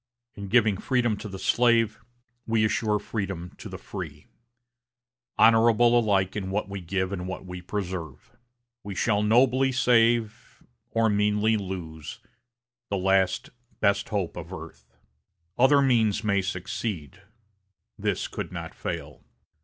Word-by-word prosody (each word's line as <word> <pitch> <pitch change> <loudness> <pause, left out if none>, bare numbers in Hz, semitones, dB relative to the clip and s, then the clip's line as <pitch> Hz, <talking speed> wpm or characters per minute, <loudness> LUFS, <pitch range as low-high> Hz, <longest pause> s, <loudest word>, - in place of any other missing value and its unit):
In 100 -1 -7
giving 110 -2 +3
freedom 120 -1 +1
to 105 - -7
the 95 - -7
slave, 115 +1 +2 0.5
we 110 -1 +2
assure 110 0 +1
freedom 95 -4 -4
to - - -8
the - - -7
free - - -8 1.1
honorable 115 +1 +5
alike 100 -4 +1
in 95 -3 -3
what 100 +2 -1
we 100 -1 -6
give 95 +2 -2
and 90 -2 -4
what 95 0 -6
we 90 0 -7
preserve. 90 -7 -5 0.5
We 100 -1 -6
shall 105 0 +1
nobly 125 +5 +3
save, 115 -3 +1 0.3
or 115 0 +2
meanly 105 +1 +2
lose, 90 -6 -6 0.7
the 100 - -1
last, 95 0 +1 0.3
best 100 -1 +1
hope 100 -6 -2
of 85 0 -8
earth. 85 -3 -11 0.6
Other 140 +3 +5
means 110 -5 +2
may 100 -2 +2
succeed, 95 -1 -4 0.7
this - - -2
could - - -6
not - - -6
fail. - - -6
105 Hz, 130 wpm, -26 LUFS, 95-115 Hz, 1.1 s, honorable